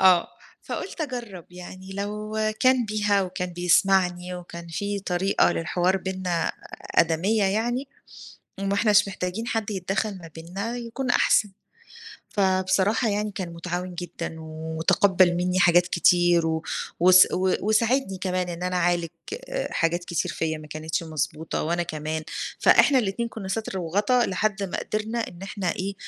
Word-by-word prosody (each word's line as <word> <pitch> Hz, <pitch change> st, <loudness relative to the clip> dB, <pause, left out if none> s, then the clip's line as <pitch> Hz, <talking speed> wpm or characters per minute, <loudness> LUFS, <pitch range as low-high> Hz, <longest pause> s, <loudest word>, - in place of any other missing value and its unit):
آه. 185 Hz, -2 st, +5 dB, 0.3 s
فقُلت -, -, -6 dB
أجرب 240 Hz, -, -5 dB
يعني 185 Hz, +1 st, -10 dB
لو 210 Hz, +2 st, -4 dB, 0.2 s
كان 255 Hz, -2 st, +4 dB
بيها 205 Hz, -2 st, +1 dB
وكان 180 Hz, -1 st, -4 dB
بيسمعني 180 Hz, 0 st, +2 dB
وكان 170 Hz, -1 st, -9 dB
فيه 200 Hz, +4 st, -3 dB
طريقة 185 Hz, -1 st, +2 dB
للحوار 180 Hz, +3 st, +1 dB
بينّا 185 Hz, -3 st, -2 dB, 0.4 s
آدمية 185 Hz, +6 st, +3 dB
يعني، 240 Hz, +7 st, 0 dB, 0.7 s
وإحنا 200 Hz, +2 st, +1 dB
مش 205 Hz, -1 st, +5 dB
محتاجين 190 Hz, +4 st, -4 dB
حد 220 Hz, -3 st, -2 dB
يتدخل 195 Hz, +1 st, -2 dB
ما 165 Hz, -2 st, -11 dB
بينّا 195 Hz, +9 st, -5 dB
يكون 245 Hz, +2 st, -4 dB
أحسن. 210 Hz, -3 st, +3 dB, 0.8 s
فبصراحة 190 Hz, +3 st, +2 dB
يعني 210 Hz, +1 st, -1 dB
كان 180 Hz, -3 st, -5 dB
متعاون 180 Hz, +1 st, -4 dB
جدًا 170 Hz, -1 st, -5 dB
وتقبل 160 Hz, +4 st, +2 dB
مني 180 Hz, +1 st, 0 dB
حاجات 175 Hz, 0 st, +5 dB
كتير 175 Hz, -1 st, +3 dB
و 160 Hz, 0 st, -1 dB, 0.4 s
وس 185 Hz, +1 st, +8 dB, 0.3 s
وساعدني 220 Hz, 0 st, +1 dB
كمان 185 Hz, -1 st, -1 dB
إن 175 Hz, +1 st, -5 dB
أنا 180 Hz, 0 st, -1 dB
أعالج 175 Hz, -1 st, +1 dB, 0.4 s
آآ -, -, -2 dB
حاجات 170 Hz, +1 st, 0 dB
كتير 170 Hz, -4 st, -1 dB
فيا 160 Hz, -1 st, -2 dB
ما 155 Hz, 0 st, -11 dB
كانتش 155 Hz, +2 st, -3 dB
مضبوطة 155 Hz, 0 st, -3 dB
وأنا 170 Hz, +2 st, 0 dB
كمان. 155 Hz, 0 st, -4 dB, 0.4 s
فإحنا 275 Hz, -2 st, +6 dB
الاتنين 230 Hz, +1 st, -1 dB
كنا 215 Hz, -4 st, -7 dB
ستر 195 Hz, 0 st, -3 dB
وغطا، 205 Hz, +8 st, +2 dB
لحد 200 Hz, +1 st, -1 dB
ما 190 Hz, -, -3 dB
قدرنا 215 Hz, +2 st, -3 dB
إن 175 Hz, +1 st, -12 dB
إحنا 195 Hz, -3 st, -2 dB
إيه 195 Hz, +2 st, -3 dB
185 Hz, 140 wpm, -25 LUFS, 175-210 Hz, 0.8 s, وس